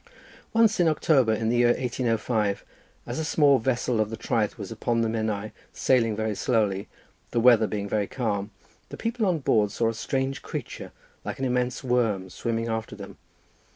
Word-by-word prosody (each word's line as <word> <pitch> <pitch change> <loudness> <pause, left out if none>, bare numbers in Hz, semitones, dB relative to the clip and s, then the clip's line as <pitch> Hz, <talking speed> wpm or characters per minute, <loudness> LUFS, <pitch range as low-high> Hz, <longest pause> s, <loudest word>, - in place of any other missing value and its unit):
"Once 225 -3 +3
in 175 - +4
October, 145 -6 +3
in 110 0 0
the 120 - +1
year 120 0 +5
1805, 115 -4 -1 0.4
as - - -4
a - - -1
small 145 -3 +4
vessel 125 -1 0
of 105 - -1
the 115 - -5
Traeth 105 -2 -1
was 100 -1 -7
upon 115 +1 -1
the 115 - +1
Menai, 110 -2 -2 0.2
sailing 115 -4 +2
very 110 0 -1
slowly, 105 -3 0 0.4
the 120 - 0
weather 115 -2 +6
being 100 -1 -3
very 105 -1 0
calm, 105 -5 -2 0.4
the - - -8
people 230 -2 -1
on 180 -3 +2
board 110 -7 +2
saw 115 +2 0
a - - -2
strange 135 +4 -2
creature - - -6 0.3
like - - -5
an 135 - -2
immense 125 0 -1
worm 110 -7 0
swimming 115 +3 -2
after 110 -1 -3
them. - - -11
115 Hz, 180 wpm, -26 LUFS, 110-130 Hz, 0.4 s, weather